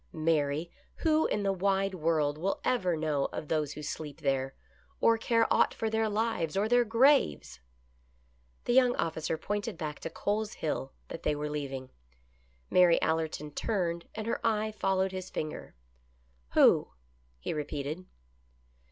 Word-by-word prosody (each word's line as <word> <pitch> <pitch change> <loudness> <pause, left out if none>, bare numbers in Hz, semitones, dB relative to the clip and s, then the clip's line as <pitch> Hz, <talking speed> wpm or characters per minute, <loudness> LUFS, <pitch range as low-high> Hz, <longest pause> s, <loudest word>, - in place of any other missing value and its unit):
Mary, 155 0 0 0.3
who 315 0 +4
in 205 - -1
the 195 -1 +2
wide 195 +1 +1
world 155 -4 +1
will 195 +4 -1
ever 185 -9 +1
know 150 -3 0
of 150 - -5
those 150 -2 0
who 150 - -8
sleep 150 -1 -6
there, 135 -1 0 0.4
or 230 - +5
care 230 0 +2
aught - - +3
for 220 -1 -2
their 220 0 +1
lives 210 -6 -1
or 205 +2 +2
their 245 +1 +4
graves? 230 - +3 0.6
" 60 0 -37
The 240 - +1
young 250 -1 +5
officer 160 0 -1
pointed 205 +1 -3
back 150 -3 -5
to - - -5
Cole's 210 +5 -2
Hill 135 -3 -3 0.2
that - - -6
they 150 - 0
were 150 0 -3
leaving. 135 -3 -4 0.8
Mary 180 -2 +6
Allerton 160 -2 -1
turned, 170 -2 -2
and 215 -1 -4
her 230 - -2
eye 220 -1 +1
followed 190 -2 0
his 185 -1 -6
finger. 155 - -5 0.4
" 60 0 -37
Who? - - +6 0.3
" 60 0 -37
he - - -3
repeated. 150 +3 -4
165 Hz, 160 wpm, -30 LUFS, 145-210 Hz, 0.8 s, Mary